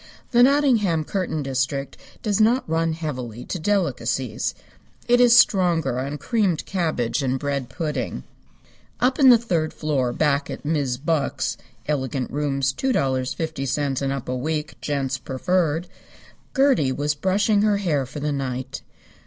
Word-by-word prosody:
The 240 Hz, -1 st, +5 dB
Nottingham 245 Hz, -, +3 dB
curtain 165 Hz, -3 st, -2 dB
district 135 Hz, +1 st, -2 dB, 0.3 s
does 210 Hz, -1 st, +1 dB
not 240 Hz, +4 st, +3 dB
run 165 Hz, 0 st, 0 dB
heavily 125 Hz, -8 st, -5 dB
to 180 Hz, -, -4 dB
delicacies. 195 Hz, +2 st, -1 dB, 0.5 s
It 245 Hz, 0 st, +5 dB
is 240 Hz, -1 st, +7 dB
stronger 175 Hz, -, +3 dB
on 140 Hz, +3 st, -3 dB
creamed 200 Hz, -5 st, 0 dB
cabbage 155 Hz, -9 st, -1 dB
and 130 Hz, -1 st, 0 dB
bread 140 Hz, -2 st, -3 dB
pudding. 150 Hz, -, -3 dB, 0.8 s
Up 250 Hz, +4 st, +1 dB
in 270 Hz, -2 st, +8 dB
the 245 Hz, -, +9 dB
third 170 Hz, -9 st, -1 dB
floor 140 Hz, -5 st, 0 dB
back 145 Hz, +1 st, +1 dB
at -, -, -7 dB
Mis' 145 Hz, -5 st, 0 dB
Buck's 150 Hz, +1 st, -1 dB, 0.3 s
(elegant 130 Hz, -3 st, -2 dB
rooms 135 Hz, -2 st, 0 dB
$2.50 140 Hz, -, -1 dB
and 135 Hz, -1 st, 0 dB
up 135 Hz, -2 st, -4 dB
a 130 Hz, -, -2 dB
week. 150 Hz, +3 st, -2 dB
Gents 135 Hz, -2 st, -2 dB
preferred) 165 Hz, +4 st, 0 dB, 0.7 s
Gertie 265 Hz, -, +3 dB
was 145 Hz, +2 st, 0 dB
brushing 200 Hz, +6 st, +2 dB
her 210 Hz, -1 st, +3 dB
hair 150 Hz, -9 st, 0 dB
for 145 Hz, +3 st, -7 dB
the 150 Hz, +1 st, -1 dB
night. 130 Hz, -1 st, -4 dB
150 Hz, 140 wpm, -23 LUFS, 135-190 Hz, 0.8 s, the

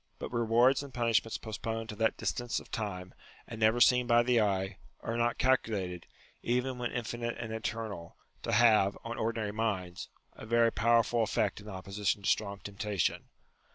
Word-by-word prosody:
But -, -, -7 dB
rewards 120 Hz, +3 st, +3 dB
and 140 Hz, -1 st, -9 dB
punishments 115 Hz, -2 st, +1 dB
postponed 115 Hz, 0 st, -4 dB
to 105 Hz, -, -5 dB
that 110 Hz, 0 st, +1 dB
distance 120 Hz, -1 st, -2 dB
of -, -, -16 dB
time, 95 Hz, -5 st, -4 dB, 0.3 s
and 115 Hz, -, -8 dB
never 110 Hz, +2 st, +3 dB
seen 125 Hz, 0 st, +5 dB
by 120 Hz, 0 st, +5 dB
the 120 Hz, -1 st, +3 dB
eye, 95 Hz, -1 st, 0 dB, 0.2 s
are 115 Hz, -, -3 dB
not 120 Hz, 0 st, +1 dB
calculated, 100 Hz, -9 st, 0 dB, 0.3 s
even 125 Hz, +1 st, -1 dB
when 120 Hz, -1 st, -2 dB
infinite 120 Hz, 0 st, -3 dB
and 115 Hz, -2 st, -5 dB
eternal, 110 Hz, -5 st, -5 dB, 0.2 s
to -, -, -3 dB
have, 110 Hz, -3 st, +4 dB
on 115 Hz, 0 st, -5 dB
ordinary 110 Hz, -2 st, -1 dB
minds, 100 Hz, -5 st, -3 dB, 0.2 s
a 110 Hz, -, -11 dB
very 115 Hz, 0 st, +4 dB
powerful 115 Hz, 0 st, +2 dB
eifect 105 Hz, 0 st, 0 dB
in 105 Hz, -, -10 dB
opposition 100 Hz, +1 st, -2 dB
to -, -, +1 dB
strong 100 Hz, -2 st, -1 dB
temptation. 100 Hz, -3 st, -2 dB
115 Hz, 165 wpm, -31 LUFS, 105-120 Hz, 0.3 s, seen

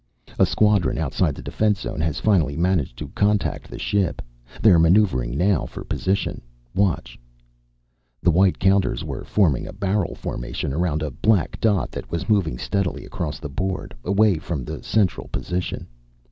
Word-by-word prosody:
"A -, -, +6 dB
squadron 105 Hz, -5 st, +2 dB
outside 80 Hz, -4 st, 0 dB
the -, -, -9 dB
defense 105 Hz, -2 st, 0 dB
zone 75 Hz, -, -4 dB
has 80 Hz, -2 st, -1 dB
finally 80 Hz, -9 st, +2 dB
managed 85 Hz, -8 st, 0 dB
to -, -, -6 dB
contact 105 Hz, 0 st, 0 dB
the -, -, -8 dB
ship. 100 Hz, -3 st, 0 dB, 0.4 s
They're 95 Hz, -7 st, +6 dB
maneuvering 80 Hz, -, +3 dB
now, 95 Hz, 0 st, +2 dB
for -, -, -8 dB
position. 95 Hz, +1 st, -1 dB, 0.3 s
Watch." 85 Hz, -11 st, 0 dB, 1.0 s
The 90 Hz, -, +5 dB
white 95 Hz, +3 st, +3 dB
counters 95 Hz, +1 st, +2 dB
were -, -, -5 dB
forming 85 Hz, -, +1 dB
a -, -, -8 dB
barrel 100 Hz, -1 st, -1 dB
formation -, -, -4 dB
around 80 Hz, -1 st, 0 dB
a 75 Hz, -, -3 dB
black 100 Hz, -, +1 dB
dot 105 Hz, -5 st, +2 dB
that -, -, -7 dB
was 85 Hz, 0 st, -3 dB
moving 95 Hz, -, +2 dB
steadily 100 Hz, +6 st, -2 dB
across 75 Hz, -3 st, -4 dB
the 75 Hz, -, -6 dB
board, 95 Hz, +6 st, -3 dB
away 100 Hz, -2 st, +3 dB
from 75 Hz, -4 st, -4 dB
the -, -, -6 dB
central 105 Hz, -5 st, 0 dB
position. 90 Hz, 0 st, -3 dB
90 Hz, 160 wpm, -23 LUFS, 75-100 Hz, 1.0 s, A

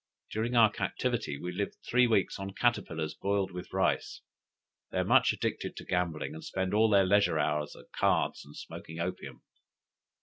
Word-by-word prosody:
During 115 Hz, +3 st, -1 dB
our 110 Hz, -3 st, +6 dB
captivity 70 Hz, -, -2 dB
we 90 Hz, +5 st, -5 dB
lived 100 Hz, +3 st, -3 dB
three 125 Hz, +1 st, +4 dB
weeks 110 Hz, -5 st, +1 dB
on 95 Hz, 0 st, -6 dB
caterpillars 80 Hz, -10 st, 0 dB
boiled 100 Hz, -1 st, -1 dB
with 90 Hz, 0 st, -8 dB
rice. 95 Hz, 0 st, 0 dB, 0.7 s
They -, -, -4 dB
are -, -, +2 dB
much -, -, +5 dB
addicted -, -, -3 dB
to -, -, -8 dB
gambling, 90 Hz, -, -1 dB
and 160 Hz, +1 st, -9 dB
spend 95 Hz, -, -2 dB
all 110 Hz, +1 st, +4 dB
their 100 Hz, -2 st, +5 dB
leisure 100 Hz, -3 st, +3 dB
hours 75 Hz, 0 st, 0 dB
at -, -, -16 dB
cards -, -, +1 dB
and 75 Hz, -, -14 dB
smoking 80 Hz, +1 st, -8 dB
opium." 90 Hz, +2 st, -5 dB
95 Hz, 170 wpm, -30 LUFS, 85-110 Hz, 0.7 s, our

